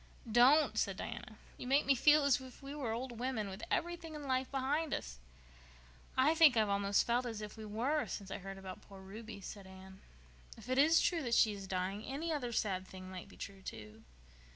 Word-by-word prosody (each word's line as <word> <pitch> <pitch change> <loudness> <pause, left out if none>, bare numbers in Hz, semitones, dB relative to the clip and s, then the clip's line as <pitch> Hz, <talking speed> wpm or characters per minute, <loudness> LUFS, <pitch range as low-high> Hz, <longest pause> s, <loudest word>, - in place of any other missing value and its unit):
"Don't!" 260 +7 +5
said - - 0
Diana. - - -7 0.2
"You - - -6
make 275 +3 +3
me 275 - +5
feel 295 +3 +5
as 280 -1 +3
if 260 +1 -12
we 275 +1 -6
were 275 -6 -3
old 240 0 -4
women 240 -5 -2
with 190 +2 -8
everything 340 -2 -2
in 300 - -7
life 260 0 0
behind 280 +3 0
us." - - -7 1.0
"I 270 +5 +5
think 315 -7 +6
I've 215 -2 +3
almost 200 0 +2
felt 245 +1 +1
as 225 -3 -4
if 210 -1 -7
we 220 - -8
were 250 +9 0
since 195 -2 -6
I - - -4
heard 195 0 -7
about 190 -1 -8
poor 195 -1 -13
Ruby," 205 +2 -9
said 195 +1 -8
Anne. 190 0 -13 0.6
"If 225 +2 -12
it 255 +1 +2
is 320 +3 +6
true 340 -2 +1
that 240 -4 +1
she 215 - +5
is 195 -1 -7
dying 190 +3 -2
any 315 +7 -3
other 250 -5 -2
sad 190 -5 -1
thing 185 0 -10
might 185 -1 -8
be - - -15
true, 195 -1 -8
too." 110 - -9
230 Hz, 215 wpm, -35 LUFS, 195-275 Hz, 1.0 s, think